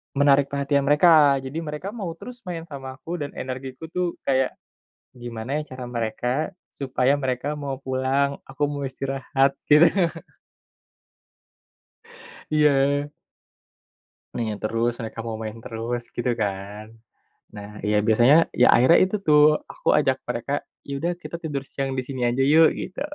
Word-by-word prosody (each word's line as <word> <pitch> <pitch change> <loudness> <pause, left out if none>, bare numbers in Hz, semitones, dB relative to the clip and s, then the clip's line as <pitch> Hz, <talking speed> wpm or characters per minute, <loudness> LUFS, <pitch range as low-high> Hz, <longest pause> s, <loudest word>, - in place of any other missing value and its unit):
Menarik 140 0 +4
perhatian 140 0 0
mereka, 145 -3 +5
jadi 135 +5 -5
mereka 160 +4 -5
mau 210 -5 -6
terus 245 +8 -10
main 170 -2 -4
sama 135 -2 -7
aku 170 +5 -6
dan 145 -1 -5
energiku 130 +4 -6
tuh 180 -1 -1
kayak 130 -1 +1 0.6
gimana 120 0 -7
ya 155 - -1
cara 130 -1 -7
mereka, 115 0 -3 0.4
supaya 135 0 0
mereka 135 +2 -2
mau 140 -2 -5
pulang, 135 +2 0
aku 135 +2 -7
mau 145 -1 -4
istirahat, 135 0 -1
gitu. 150 +3 +7 2.6
Iya. 145 -1 +2 1.2
Nanya 110 -3 -2
terus, 115 +2 0
mereka 115 0 -6
mau 110 -1 -3
main 110 0 -5
terus 115 +2 -4
gitu 120 +1 0
kan. 100 +1 -4 0.7
Nah 105 0 -8 0.2
ya 105 - +3
biasanya 120 +6 +6 0.2
ya - - +5
akhirnya 130 +7 +6
itu 190 - -3
tuh, 150 -1 +6 0.3
aku - - -3
ajak - - +2
mereka, - - -3 0.3
yaudah 140 +5 -2
kita - - -6
tidur 140 -3 -3
siang 135 -1 -4
disini 130 0 -4
aja 130 +2 +1
yuk 160 +2 +6
gitu. 185 - -6
135 Hz, 135 wpm, -24 LUFS, 125-150 Hz, 2.6 s, gitu